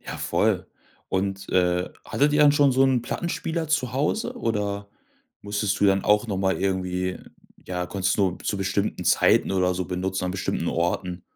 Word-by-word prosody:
Ja, - - -7
voll. - - 0 0.4
Und, 95 0 -2
äh, 90 0 +2 0.2
hattet 145 +1 +2
ihr 150 - +3
dann 145 -1 +7
schon 145 -2 +4
so 130 +1 +3
'n 130 -3 +2
Plattenspieler 165 +3 -3
zu 145 -5 0
Hause 215 - -1
oder 100 - -2 0.5
musstest 100 -1 -1
du - - +4
dann 95 -1 +2
auch 105 +2 +3
noch 100 -4 -2
mal 95 0 +1
irgendwie 90 -1 -1 0.5
ja, 90 -1 -2
konntest 95 0 -1
du - - +4
nur 90 - -9
zu 100 - -2
bestimmten 95 +1 -1
Zeiten - - +3
oder 90 -1 +1
so 90 +1 -2
benutzen? 95 +1 -2
An 90 - -1
bestimmten 95 0 -2
Orten? 85 +1 -2
95 Hz, 180 wpm, -24 LUFS, 95-125 Hz, 0.5 s, dann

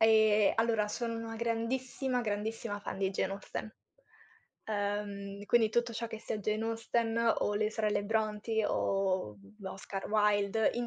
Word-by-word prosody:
Ehm, 220 -2 +6
allora 225 -2 +2
sono 230 +1 -2
una 225 0 -5
grandissima, 245 +3 -1
grandissima 210 0 -2
fan 195 - -5
di 190 -1 +1
Jane 195 0 -1
Austen. 200 +2 -6 0.9
Ehm, 205 -1 -3
quindi 225 +1 +4
tutto 235 0 +1
ciò 230 +1 -3
che 220 - -6
sia 215 - -3
Jane 215 +2 -1
Austen 230 0 +1
o 205 - 0
le 215 +1 +1
sorelle 210 -2 0
Brontë 220 0 0
o, 190 - 0
mhmm, 100 - -13
Oscar 195 0 -6
Wilde, 210 0 +3
in 240 0 -1
215 Hz, 150 wpm, -32 LUFS, 205-225 Hz, 0.9 s, Ehm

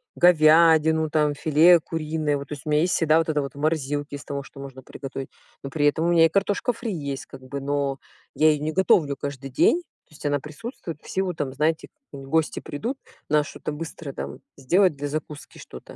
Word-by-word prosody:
говядину, 160 -1 +5
там, 150 -1 +2
филе 160 +4 +5
куриное. 155 -2 -2
Вот, 140 - -8
то - - -4
есть, 140 -3 -9
у - - -4
меня 150 +1 +3
есть 180 - +1
всегда 160 -1 +3
вот 165 - -1
это 150 -2 +1
вот 140 +1 -6
в - - -10
морозилке, 145 -1 -1
из 140 - -11
того, 140 -1 -4
что 135 - -14
можно 135 -1 -9
приготовить. 135 0 -7 0.3
Но 135 - -5
при 145 -1 +2
этом 160 +3 +1
у - - +2
меня 170 -1 +6
и - - +3
картошка 200 +7 0
фри 230 -2 -5
есть, 140 -4 -5
как 135 - -12
бы. 140 +2 -6
Но 140 0 -1 0.4
я 155 0 +5
её 150 -1 -2
не 155 - -1
готовлю 160 -5 +3
каждый 140 -1 -6
день. 330 - +3 0.3
То - - -23
есть 150 - -12
она 145 0 +1
присутствует 165 - -8
в - - -14
силу 190 -1 -1
там, 145 -4 -4
знаете, 155 +3 0 0.2
гости 140 +3 -1
придут, 230 - -5 0.3
надо 150 -1 +3
что-то - - -6
быстро 155 -1 -7
там - - -7 0.2
сделать 175 +6 +3
для 145 +1 -3
закуски 150 0 -6
что-то. 60 - -12
150 Hz, 215 wpm, -24 LUFS, 140-165 Hz, 0.4 s, меня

